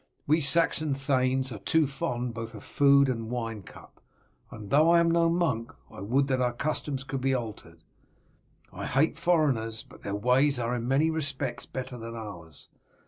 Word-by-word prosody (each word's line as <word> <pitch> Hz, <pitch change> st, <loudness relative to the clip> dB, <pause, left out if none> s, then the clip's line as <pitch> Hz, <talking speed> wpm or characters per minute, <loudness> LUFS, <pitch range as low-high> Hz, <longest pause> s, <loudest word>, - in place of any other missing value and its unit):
We 155 Hz, +3 st, +3 dB
Saxon 155 Hz, -1 st, +3 dB
thanes 130 Hz, -1 st, 0 dB
are 110 Hz, -, -6 dB
too 160 Hz, +10 st, +2 dB
fond 125 Hz, -4 st, -3 dB
both 115 Hz, 0 st, -7 dB
of 105 Hz, -, -10 dB
food 140 Hz, -1 st, +4 dB
and 115 Hz, -3 st, -3 dB
wine 115 Hz, -3 st, -4 dB
cup, -, -, -15 dB, 0.5 s
and 105 Hz, -2 st, -10 dB
though 155 Hz, +3 st, +5 dB
I 170 Hz, 0 st, +6 dB
am 170 Hz, 0 st, +3 dB
no 170 Hz, 0 st, +3 dB
monk 160 Hz, -10 st, 0 dB, 0.2 s
I -, -, -10 dB
would 130 Hz, +8 st, +1 dB
that 130 Hz, -2 st, 0 dB
our 125 Hz, -1 st, +1 dB
customs 140 Hz, 0 st, -2 dB
could 135 Hz, -1 st, -4 dB
be 135 Hz, 0 st, +1 dB
altered. 105 Hz, -9 st, -7 dB, 0.9 s
I -, -, -5 dB
hate 140 Hz, +5 st, +2 dB
foreigners, 140 Hz, -11 st, 0 dB
but -, -, -17 dB
their 100 Hz, -, -4 dB
ways 125 Hz, +6 st, +2 dB
are 120 Hz, 0 st, -2 dB
in 120 Hz, -1 st, -3 dB
many 145 Hz, +5 st, +2 dB
respects 140 Hz, -5 st, -3 dB
better 130 Hz, -1 st, -6 dB
than 115 Hz, +1 st, -7 dB
ours. 85 Hz, -9 st, -10 dB
130 Hz, 180 wpm, -28 LUFS, 115-145 Hz, 0.9 s, I